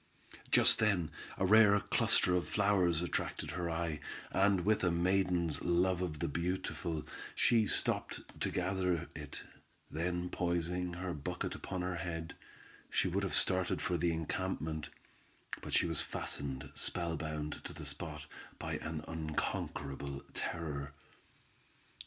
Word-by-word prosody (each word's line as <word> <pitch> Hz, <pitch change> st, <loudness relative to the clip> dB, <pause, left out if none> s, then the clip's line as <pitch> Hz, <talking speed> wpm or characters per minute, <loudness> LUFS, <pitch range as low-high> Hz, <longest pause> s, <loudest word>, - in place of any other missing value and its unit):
Just -, -, +7 dB
then, 95 Hz, -8 st, +2 dB, 0.3 s
a 95 Hz, -, +2 dB
rare 105 Hz, 0 st, +7 dB
cluster 90 Hz, -, +3 dB
of 90 Hz, -1 st, +1 dB
flowers 95 Hz, -5 st, +3 dB
attracted 90 Hz, -, -2 dB
her 90 Hz, -2 st, -2 dB
eye, 80 Hz, -2 st, -1 dB, 0.3 s
and 95 Hz, -2 st, +3 dB
with 110 Hz, -1 st, +3 dB
a 90 Hz, -, +4 dB
maiden's 90 Hz, -1 st, +2 dB
love 90 Hz, +1 st, +2 dB
of 85 Hz, -5 st, -2 dB
the 85 Hz, -, -1 dB
beautiful, 85 Hz, -1 st, -2 dB, 0.3 s
she 115 Hz, -3 st, +4 dB
stopped -, -, -1 dB, 0.2 s
to -, -, +2 dB
gather 90 Hz, -2 st, 0 dB
it, 75 Hz, -2 st, -7 dB, 0.5 s
then 90 Hz, +2 st, -1 dB
poising 90 Hz, 0 st, 0 dB
her 90 Hz, 0 st, -3 dB
bucket 90 Hz, +4 st, -3 dB
upon 90 Hz, -1 st, -4 dB
her 90 Hz, -1 st, -1 dB
head, 80 Hz, -2 st, -4 dB, 0.6 s
she -, -, +2 dB
would 95 Hz, +3 st, 0 dB
have 95 Hz, -, -1 dB
started 90 Hz, -1 st, +1 dB
for 90 Hz, -, 0 dB
the 85 Hz, 0 st, +2 dB
encampment, 80 Hz, -1 st, -2 dB, 0.7 s
but -, -, -7 dB
she -, -, +4 dB
was 85 Hz, -3 st, 0 dB
fastened 70 Hz, -1 st, -3 dB
spell 85 Hz, -2 st, 0 dB
bound 75 Hz, -1 st, -4 dB
to -, -, -6 dB
the -, -, -8 dB
spot, -, -, -4 dB, 0.3 s
by -, -, -3 dB
an 80 Hz, -1 st, -4 dB
unconquerable 70 Hz, -3 st, -3 dB
terror. 75 Hz, -4 st, -3 dB
85 Hz, 135 wpm, -34 LUFS, 80-90 Hz, 0.7 s, Just